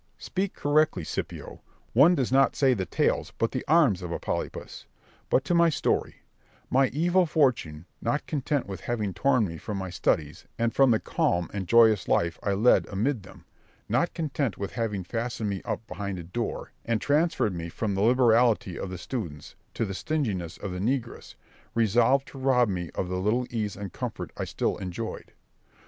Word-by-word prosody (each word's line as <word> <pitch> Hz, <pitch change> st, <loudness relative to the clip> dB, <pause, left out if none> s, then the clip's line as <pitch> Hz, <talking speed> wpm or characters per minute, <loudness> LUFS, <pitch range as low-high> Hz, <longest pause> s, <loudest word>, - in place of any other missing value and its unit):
Berg. -, -, -41 dB
Speak 190 Hz, 0 st, -2 dB
correctly, 145 Hz, -, +2 dB
Scipio: -, -, -6 dB, 0.3 s
one 150 Hz, +9 st, +6 dB
does 130 Hz, -6 st, -1 dB
not 135 Hz, +1 st, +4 dB
say 135 Hz, -3 st, +4 dB
the 95 Hz, -6 st, -2 dB
tails -, -, 0 dB
but 115 Hz, -, 0 dB
the 130 Hz, -, -3 dB
arms 145 Hz, -, +4 dB
of 90 Hz, -1 st, -5 dB
a -, -, -1 dB
polypus. -, -, -5 dB, 0.4 s
But 135 Hz, -, +3 dB
to -, -, 0 dB
my 170 Hz, 0 st, +5 dB
story: 155 Hz, -, -1 dB, 0.5 s
my 135 Hz, +1 st, +4 dB
evil 175 Hz, +5 st, +2 dB
fortune, 120 Hz, -, +1 dB, 0.2 s
not 145 Hz, -, -1 dB
content 145 Hz, -2 st, -1 dB
with 95 Hz, -1 st, -7 dB
having 110 Hz, -5 st, -2 dB
torn 130 Hz, +3 st, +2 dB
me 80 Hz, -2 st, -7 dB
from 105 Hz, -2 st, -5 dB
my 95 Hz, -2 st, -4 dB
studies, 80 Hz, -2 st, -1 dB
and 115 Hz, 0 st, 0 dB
from 135 Hz, -1 st, +5 dB
the 110 Hz, -2 st, +4 dB
calm 85 Hz, -1 st, 0 dB
and 95 Hz, -3 st, -4 dB
joyous 110 Hz, -3 st, +5 dB
life 85 Hz, -1 st, +1 dB
I 100 Hz, -, 0 dB
led 110 Hz, +6 st, +4 dB
amid 110 Hz, +5 st, -1 dB
them; 95 Hz, -, -15 dB, 0.4 s
not 120 Hz, +11 st, 0 dB
content 140 Hz, -, -2 dB
with 100 Hz, -1 st, -4 dB
having 110 Hz, -5 st, -2 dB
fastened 115 Hz, +1 st, -3 dB
me 95 Hz, -, -3 dB
up 115 Hz, -, -3 dB
behind 100 Hz, -3 st, -5 dB
a 85 Hz, -, -6 dB
door, 115 Hz, +8 st, -4 dB
and 115 Hz, -2 st, 0 dB
transferred 145 Hz, -, +1 dB
me 85 Hz, -1 st, -5 dB
from 100 Hz, +4 st, -2 dB
the 95 Hz, -, -1 dB
liberality 115 Hz, -5 st, +3 dB
of 95 Hz, -, -4 dB
the 90 Hz, -, -5 dB
students 85 Hz, -, -6 dB, 0.2 s
to 115 Hz, -, 0 dB
the 95 Hz, -, -4 dB
stinginess 95 Hz, -, -2 dB
of 100 Hz, -, -5 dB
the 90 Hz, -, -4 dB
negress, 120 Hz, +3 st, -3 dB, 0.4 s
resolved 120 Hz, +4 st, +3 dB
to 135 Hz, -, -10 dB
rob 125 Hz, -3 st, +3 dB
me 90 Hz, -3 st, -3 dB
of 90 Hz, -, -2 dB
the 90 Hz, 0 st, -2 dB
little 110 Hz, +6 st, +1 dB
ease 105 Hz, -4 st, -2 dB
and 100 Hz, -3 st, -7 dB
comfort -, -, -5 dB
I -, -, -3 dB
still -, -, -1 dB
enjoyed. 90 Hz, -3 st, -6 dB
115 Hz, 190 wpm, -27 LUFS, 95-135 Hz, 0.5 s, one